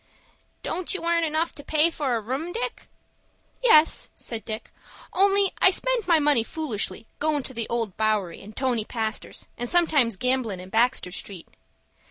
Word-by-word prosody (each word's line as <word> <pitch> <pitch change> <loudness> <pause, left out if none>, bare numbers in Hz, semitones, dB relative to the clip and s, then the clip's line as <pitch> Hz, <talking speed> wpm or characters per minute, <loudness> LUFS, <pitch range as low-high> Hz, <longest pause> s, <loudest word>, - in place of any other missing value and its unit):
"Don't 365 +1 -3
you 375 - -4
earn 335 0 +2
enough 320 +1 0
to 285 - -11
pay 310 +3 +3
for 275 -6 -1
a 225 - -1
room, 265 +10 -3
Dick?" 485 +4 -4 0.8
"Yes," 325 -10 +5
said 225 -3 -5
Dick; 220 0 -6 0.4
"only 395 +1 +3
I - - +7
spend 475 +3 0
my 335 -2 +5
money 295 -5 +3
foolish, 250 -4 -2 0.3
goin' 300 -2 0
to 260 - -6
the 230 -2 -3
Old 230 -5 -2
Bowery, 215 -5 0
and 210 +2 -12
Tony 250 -4 0
Pastor's, 220 -1 -4
and 240 0 -1
sometimes 295 - +3
gamblin' 250 -5 0
in 185 +1 -10
Baxter 230 -2 +1
Street." 190 -1 -8
265 Hz, 165 wpm, -25 LUFS, 220-335 Hz, 0.8 s, I